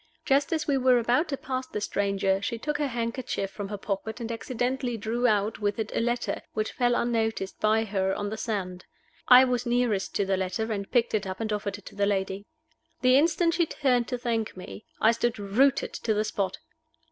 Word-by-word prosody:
Just 275 0 +2
as 315 -2 0
we 280 -3 +1
were 255 -1 +5
about 245 +7 +2
to 275 - -2
pass 255 -1 -4
the - - -4
stranger 200 -1 0
she 230 +3 -2
took 290 +5 -3
her 295 - +1
handkerchief 230 -4 -3
from 205 -2 -5
her 205 - -4
pocket, 205 +3 -4
and 235 -1 -4
accidentally 245 +1 -2
drew 230 +3 0
out 210 -1 +1
with 205 -1 -1
it 220 -1 -3
a - - +2
letter, 240 +1 -1
which 215 0 -1
fell 245 -1 +1
unnoticed 225 -5 -1
by 220 +1 +3
her, 195 -3 0
on 205 0 -3
the - - -2
sand. 190 -5 -4 0.4
I 255 +1 +9
was 250 -1 -1
nearest 240 -5 0
to 200 - +1
the 195 0 +1
letter, 190 +4 -2
and 200 -2 -3
I - - -41
picked 240 -2 +2
it 210 -2 0
up 185 0 -5
and 220 -1 -2
offered 205 -1 -3
it 205 - -17
to - - -11
the 200 0 +1
lady. 195 0 -2 0.5
The 255 0 +5
instant 335 +3 +3
she 340 -1 +2
turned 250 -6 +1
to 250 - -2
thank 230 -4 -2
me, 100 - -9
I 220 - +5
stood 235 0 -1
rooted 220 +7 +2
to 220 -2 -1
the 210 - +1
spot. 200 -3 -2
225 Hz, 215 wpm, -27 LUFS, 200-250 Hz, 0.5 s, I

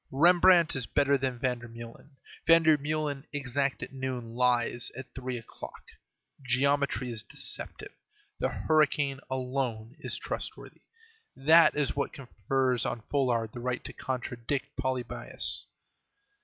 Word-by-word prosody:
Rembrandt 170 +3 +5
is 130 -4 -1
better 140 0 +3
than 130 -2 -1
Vandermeulen; 120 +2 -5 0.3
Vandermeulen, 155 -3 +3
exact 140 -1 -1
at - - -8
noon, 130 -3 -4
lies 120 -1 +2
at 130 0 -9
three 130 -1 -4
o'clock. 115 - -10 0.6
Geometry 135 0 +1
is 110 -1 0
deceptive; - - -4 0.5
the - - +1
hurricane 145 -3 +2
alone 125 -3 -2
is - - -3
trustworthy. - - -6 0.5
That 160 +5 +6
is 145 -2 0
what 140 - -1
confers 130 0 -1
on 115 - -3
Folard 120 -6 +1
the 120 - -8
right 125 +1 -2
to - - -7
contradict 130 +2 -3
Polybius. 130 -2 -3
130 Hz, 115 wpm, -29 LUFS, 125-145 Hz, 0.6 s, That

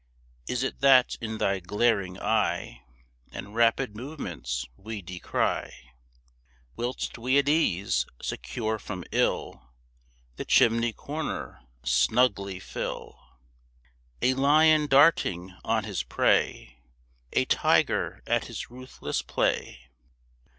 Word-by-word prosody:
Is 125 +1 -1
it 135 - -3
that 135 -2 +6
in 110 -1 -4
thy 100 -2 0
glaring 100 -1 0
eye 110 -1 -1 0.5
And 100 - -8
rapid 115 0 +2
movements 85 - -5
we 110 - -7
descry 90 0 -2 1.0
Whilst 120 0 -4
we 130 +4 +2
at 140 -1 +3
ease, 100 - +1
secure 110 -2 -3
from 90 -2 -6
ill, - - 0 0.8
The - - -5
chimney 115 +1 +4
corner 150 - -5 0.2
snugly 100 -6 +2
fill - - -6 1.0
A 130 - +4
lion 150 +3 +4
darting 135 - +3
on - - 0
his - - -3
prey, 65 0 0 0.5
A - - +2
tiger - - +1
at - - +1
his - - -7
ruthless 130 +1 -5
play? 65 - -1
115 Hz, 105 wpm, -27 LUFS, 95-135 Hz, 1.0 s, that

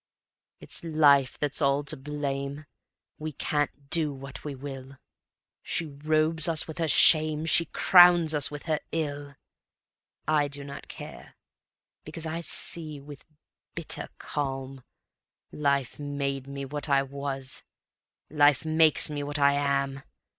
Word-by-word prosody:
It's - - -5
Life 145 -5 +3
that's 145 +1 -1
all 140 0 +2
to 145 - -1
blame: 140 +1 -4 0.5
We 155 0 -5
can't 145 0 -3
do 160 -3 +4
what 135 0 -9
we 145 -2 -5
will; 135 0 -9 0.6
She 165 - -2
robes 155 +2 +1
us 160 -2 -1
with 160 +1 -8
her 165 - +1
shame, 155 0 +5
She 170 +1 +3
crowns 175 -3 +6
us 150 -2 0
with 145 -1 -8
her 155 -3 -1
ill. 145 -3 -4 0.9
I 150 -2 +2
do 140 0 -7
not 140 0 -9
care, - - -10 0.7
because 160 +1 -5
I 160 +1 -3
see 155 -3 -2
with 140 0 -12 0.5
bitter - - -3
calm, 135 -2 -4 0.7
Life 140 -3 -1
made 140 -2 -3
me 140 0 -6
what 145 +2 -5
I 140 -1 +3
was, 135 -1 -5 0.7
Life 145 -1 +3
makes 160 -1 +3
me 150 -1 -4
what 145 +1 -3
I 140 0 +4
am. 140 -1 0
145 Hz, 135 wpm, -27 LUFS, 140-155 Hz, 0.9 s, crowns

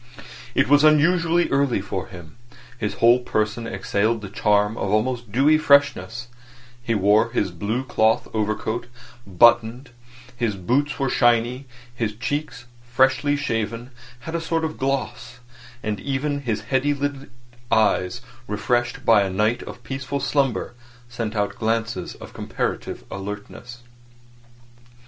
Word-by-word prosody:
It - - +3
was 145 +2 +5
unusually 165 +3 +4
early 135 -5 +2
for 95 -1 -4
him; 90 -3 -12 0.4
his 105 -2 -2
whole 120 +2 +5
person 110 -1 -2
exhaled 110 +1 -1
the 100 - -7
charm 105 +1 +2
of 100 - -3
almost 115 +2 0
dewy 145 +7 +4
freshness; 140 -5 +2 0.5
he 115 -1 -1
wore 105 +3 +3
his 100 -4 -1
blue 105 +9 -2
cloth 110 -2 +1
overcoat 110 +2 -2 0.4
unbuttoned; 120 +5 +3 0.4
his 115 -4 -1
boots 130 +10 0
were 135 - 0
shiny; 120 +2 +2 0.3
his 115 -3 -3
cheeks, 125 0 -4 0.2
freshly 130 +3 +2
shaven, 115 -2 -3 0.3
had 160 +7 -7
a 170 - -1
sort 165 0 -1
of 155 - -5
gloss; 135 -3 -3 0.5
and 105 -2 -2
even 140 +4 -2
his 115 -5 -2
heavy 130 +5 0
lidded 140 -1 -4 0.4
eyes, 110 0 +2 0.3
refreshed 120 +4 -1
by 110 -3 +6
a 100 - 0
night 105 +5 0
of 120 - -10
peaceful 135 +3 -4
slumber, 135 -4 0 0.4
sent 115 -2 -4
out 105 -1 -1
glances 115 -4 -2
of - - -12
comparative - - -4
alertness. 105 +4 -8
120 Hz, 130 wpm, -23 LUFS, 105-135 Hz, 0.5 s, by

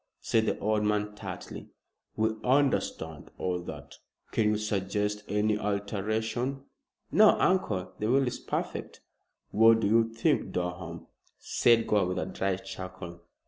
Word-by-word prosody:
said 110 -1 +1
the - - 0
old 105 0 +1
man 105 0 0
tartly. 105 - -8 0.5
"We 110 0 +2
understand 125 - 0
all 90 -1 -1
that. 90 - -9 0.3
Can 105 -2 +2
you 105 - +1
suggest 105 0 -1
any 105 +1 +1
alteration?" 110 +6 -2 0.5
"No, 215 0 +6
uncle. 105 - +1
The 105 - -1
will 135 +2 +4
is 125 - -3
perfect." - - -4 0.5
"What 115 +1 +6
do 100 - +2
you 115 +1 +3
think, 115 +3 0
Durham?" 90 -1 -4 0.3
said 115 -1 +3
Gore, 100 -3 +2
with 90 0 -2
a - - -1
dry 95 -1 -1
chuckle. 95 -2 -8
105 Hz, 140 wpm, -29 LUFS, 95-115 Hz, 0.5 s, No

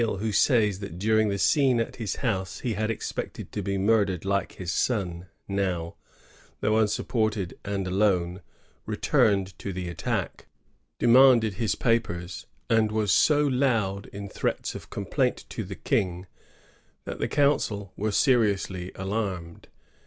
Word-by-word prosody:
Dumesnil, 110 -4 0
who 110 +1 -1
says 105 -4 +3
ihat 100 -4 -7
during 110 +2 +2
the 100 - -1
scene 130 +2 +3
at 115 - -3
his 110 -5 -3
house 95 -7 -2
he 120 -3 -1
had 110 +2 -1
expected 115 - -5
to - - -3
be 100 0 -2
muideied 100 -3 +2
like 100 -1 0
his 90 -2 -4
son^ 90 -4 -1 0.2
now, 95 -4 -1 0.7
though 110 - +1
unsupported 110 -3 0
and 100 -1 -2
alone, 90 -1 +1 0.5
returned 100 -3 +2
to 100 - -4
the 90 -1 -4
attack, 85 - -3 0.5
demanded 120 -3 +6
his 110 +3 -1
papers, 90 -7 -1 0.2
and 110 -2 +3
was 105 -3 +1
so 150 - +4
loud 115 -8 0
in 100 0 -7
threats - - -2
of - - -9
complaint - - -1
to - - -4
the - - -7
King 90 -1 -1 0.8
that - - -6
the - - 0
council 110 -9 +1
were 110 +1 -1
seriously 100 -6 +1
alarmed. 95 -4 -4
100 Hz, 145 wpm, -26 LUFS, 95-115 Hz, 0.8 s, demanded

